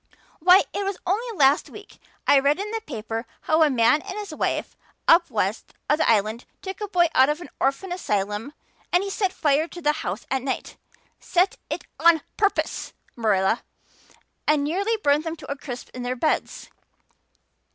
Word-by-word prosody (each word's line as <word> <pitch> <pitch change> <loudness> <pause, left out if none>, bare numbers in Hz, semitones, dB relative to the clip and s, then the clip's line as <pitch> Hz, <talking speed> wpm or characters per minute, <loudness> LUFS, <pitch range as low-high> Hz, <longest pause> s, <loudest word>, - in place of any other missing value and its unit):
Why, 365 +4 +7
it 405 - -2
was 395 -1 -2
only 435 +4 -1
last 280 0 +4
week 415 - -13 0.3
I 280 - +6
read 285 +4 +2
in 415 +1 -4
the 450 0 -3
paper 225 - -5
how 315 +1 +2
a 310 - +6
man 260 +3 +3
and 390 0 -7
his 410 -6 -6
wife - - -2 0.3
up 340 +1 +6
west - - -2
of 300 - +2
the - - +2
Island 220 +1 +1 0.2
took 385 +2 -6
a 420 - -2
boy 360 -3 +3
out 265 +2 +5
of 300 +2 -1
an 350 - -10
orphan 275 +8 0
asylum 210 - -2 0.4
and 355 +2 +3
he 395 - -4
set 390 -2 0
fire 300 0 +1
to 350 - -10
the 300 -3 +2
house 190 +6 -4
at 265 -1 +1
night 265 0 -4 0.4
set 365 +2 +1
it - - -3 0.2
on 330 -1 +5
purpose, 410 -1 0 0.2
Marilla 215 -1 +1 0.9
and 300 -1 +3
nearly 395 +9 0
burnt 290 +1 +3
them 325 0 -4
to 305 - -9
a - - -1
crisp 255 -3 -8
in 250 - -6
their 245 +1 -2
beds. 310 +5 -2
305 Hz, 185 wpm, -24 LUFS, 255-370 Hz, 0.9 s, Why